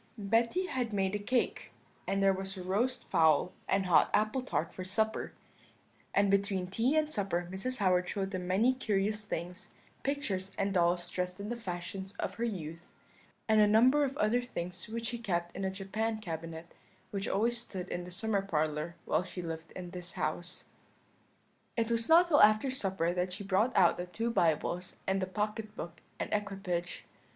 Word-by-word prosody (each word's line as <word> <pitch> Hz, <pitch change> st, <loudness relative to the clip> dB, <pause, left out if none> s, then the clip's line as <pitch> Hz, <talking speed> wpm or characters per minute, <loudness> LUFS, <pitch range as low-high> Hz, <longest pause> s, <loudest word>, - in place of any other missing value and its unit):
"Betty 230 Hz, -, +2 dB
had 250 Hz, -, -2 dB
made 195 Hz, -1 st, +1 dB
a 205 Hz, -, 0 dB
cake, 245 Hz, +4 st, -1 dB, 0.4 s
and 195 Hz, 0 st, +1 dB
there 195 Hz, 0 st, +5 dB
was 190 Hz, +1 st, -4 dB
a 185 Hz, -, -5 dB
roast 235 Hz, +8 st, 0 dB
fowl 160 Hz, +1 st, +3 dB, 0.2 s
and 195 Hz, 0 st, +2 dB
hot 175 Hz, -3 st, +5 dB
apple 215 Hz, +5 st, +2 dB
tart 255 Hz, -, -2 dB
for 185 Hz, -, -5 dB
supper; 220 Hz, +4 st, 0 dB, 0.8 s
and 200 Hz, 0 st, +4 dB
between 200 Hz, -2 st, +1 dB
tea 230 Hz, +10 st, +1 dB
and 310 Hz, -1 st, +3 dB
supper 185 Hz, -, -1 dB
Mrs. 255 Hz, +7 st, -2 dB
Howard 180 Hz, -3 st, +2 dB
showed 195 Hz, -1 st, -2 dB
them 185 Hz, -1 st, -3 dB
many 215 Hz, +8 st, +4 dB
curious 210 Hz, -3 st, 0 dB
things, 180 Hz, +1 st, -5 dB, 0.3 s
pictures, 200 Hz, -10 st, -2 dB
and 195 Hz, 0 st, 0 dB
dolls 175 Hz, -1 st, +2 dB
dressed 180 Hz, 0 st, -2 dB
in 205 Hz, +1 st, -5 dB
the 240 Hz, -, -2 dB
fashions 190 Hz, -2 st, -5 dB
of -, -, -3 dB
her -, -, +2 dB
youth, 170 Hz, -6 st, -4 dB, 0.6 s
and 220 Hz, -1 st, +5 dB
a 210 Hz, -, +6 dB
number 250 Hz, +7 st, +5 dB
of 275 Hz, 0 st, -2 dB
other 220 Hz, +4 st, +2 dB
things 180 Hz, -7 st, -5 dB
which 230 Hz, +1 st, -4 dB
she 240 Hz, -1 st, -4 dB
kept 175 Hz, -6 st, -2 dB
in 195 Hz, -, -3 dB
a 190 Hz, -, +1 dB
Japan 215 Hz, +4 st, -2 dB
cabinet, 165 Hz, -3 st, -6 dB, 0.4 s
which 195 Hz, -1 st, -2 dB
always 235 Hz, +4 st, +1 dB
stood 190 Hz, -6 st, -6 dB
in 175 Hz, -, -3 dB
the 180 Hz, -, -8 dB
summer 200 Hz, +2 st, 0 dB
parlour 155 Hz, -3 st, -1 dB
while -, -, +2 dB
she 180 Hz, 0 st, -6 dB
lived 165 Hz, -1 st, -6 dB
in 180 Hz, -1 st, -7 dB
this 180 Hz, -1 st, -6 dB
house. 175 Hz, +1 st, -3 dB, 1.1 s
"It 230 Hz, 0 st, +1 dB
was 230 Hz, -1 st, +1 dB
not 335 Hz, +2 st, +8 dB
till 300 Hz, -4 st, +5 dB
after 215 Hz, +5 st, +6 dB
supper 190 Hz, -8 st, 0 dB
that 180 Hz, 0 st, -1 dB
she 200 Hz, -, -6 dB
brought 200 Hz, +6 st, +2 dB
out 175 Hz, -, +5 dB
the 180 Hz, -, -4 dB
two 225 Hz, +6 st, -2 dB
Bibles 175 Hz, -1 st, +1 dB
and 190 Hz, 0 st, +1 dB
the 185 Hz, -, -1 dB
pocket 210 Hz, +2 st, -3 dB
book 170 Hz, -2 st, -7 dB, 0.2 s
and -, -, -1 dB
equipage. 195 Hz, -4 st, -2 dB
195 Hz, 185 wpm, -32 LUFS, 180-220 Hz, 1.1 s, not